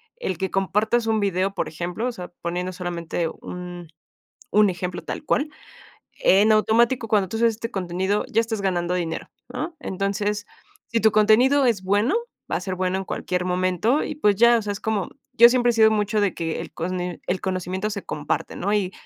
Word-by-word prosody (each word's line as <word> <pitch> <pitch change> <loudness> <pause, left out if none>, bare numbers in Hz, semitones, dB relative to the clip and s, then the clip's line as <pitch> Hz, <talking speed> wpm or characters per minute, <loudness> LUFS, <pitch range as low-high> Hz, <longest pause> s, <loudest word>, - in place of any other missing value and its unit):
el 190 - -3
que 190 +2 -2
compartas 210 +5 +1
un 220 -1 +2
video, 195 -1 0
por - - -2
ejemplo, 175 +8 -3
o - - -1
sea, 180 -5 -8
poniendo 180 +2 -2
solamente 175 -2 -3
un 175 0 -8 0.6
un 210 -1 +5
ejemplo 180 0 -4
tal - - -6
cual, 295 0 +1 0.7
en 205 +3 +5
automático 230 +3 +3
cuando 205 -3 +2
tú 225 - -4
haces 230 +1 +4
este 230 +1 -5
contenido 190 +1 -1
ya 225 - +4
estás 225 -2 -3
ganando 180 -2 0
dinero, 170 -3 -3 0.2
¿no? 340 - -4
Entonces, 200 +2 -2 0.4
si 230 - 0
tu 220 - +5
contenido 240 +6 +5
es 220 -6 +1
bueno, 205 - +2 0.4
va - - +1
a - - -2
ser 185 0 -3
bueno 185 0 -1
en 195 - -4
cualquier 180 -1 -2
momento 185 - +1
y, - - -4
pues, 210 -9 +3
ya, 235 +3 +6
o - - -3
sea, 205 -1 -2
es 200 - -7
como 215 -4 -1 0.2
yo 235 +1 +9
siempre 245 0 +3
he - - +2
sido 220 -1 +5
mucho 210 0 +1
de 205 -2 +1
que 165 -1 -3
el - - -8
cono 180 +2 -3 0.3
el 180 0 -1
conocimiento 185 +2 -2
se 200 -2 -5
comparte, 150 -1 -3
¿no? 200 - -1
Y 200 -3 0
200 Hz, 200 wpm, -23 LUFS, 180-220 Hz, 0.7 s, yo